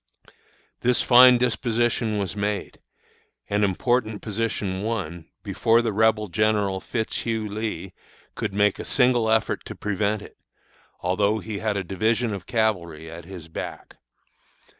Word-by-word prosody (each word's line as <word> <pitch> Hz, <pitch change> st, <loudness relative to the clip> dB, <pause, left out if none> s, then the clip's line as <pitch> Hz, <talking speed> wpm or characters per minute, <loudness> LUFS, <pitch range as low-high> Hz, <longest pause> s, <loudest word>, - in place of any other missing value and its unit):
"This 125 Hz, 0 st, +2 dB
fine 125 Hz, 0 st, +8 dB
disposition 120 Hz, -2 st, 0 dB
was 100 Hz, -2 st, -2 dB
made, 105 Hz, 0 st, -3 dB, 0.7 s
and 105 Hz, +1 st, +1 dB
important 110 Hz, +2 st, 0 dB
position 105 Hz, -3 st, -2 dB
won, 95 Hz, -7 st, -4 dB
before 115 Hz, +1 st, +2 dB
the 115 Hz, -2 st, -1 dB
Rebel 110 Hz, 0 st, +3 dB
General 100 Hz, +1 st, +1 dB
Fitzhugh 110 Hz, 0 st, -2 dB
Lee 105 Hz, -3 st, -4 dB, 0.4 s
could -, -, -3 dB
make 100 Hz, 0 st, +2 dB
a -, -, -4 dB
single 125 Hz, -4 st, +2 dB
effort 110 Hz, -1 st, +1 dB
to -, -, -7 dB
prevent 105 Hz, +1 st, -1 dB
it, -, -, -14 dB, 0.6 s
although 100 Hz, +4 st, +1 dB
he 110 Hz, -1 st, -5 dB
had 110 Hz, -1 st, -1 dB
a 95 Hz, -, -1 dB
division 110 Hz, +5 st, 0 dB
of 100 Hz, -, -7 dB
cavalry 85 Hz, -9 st, -1 dB
at 85 Hz, 0 st, -9 dB
his 90 Hz, -3 st, -9 dB
back. 80 Hz, -, -7 dB
105 Hz, 135 wpm, -24 LUFS, 95-115 Hz, 0.7 s, fine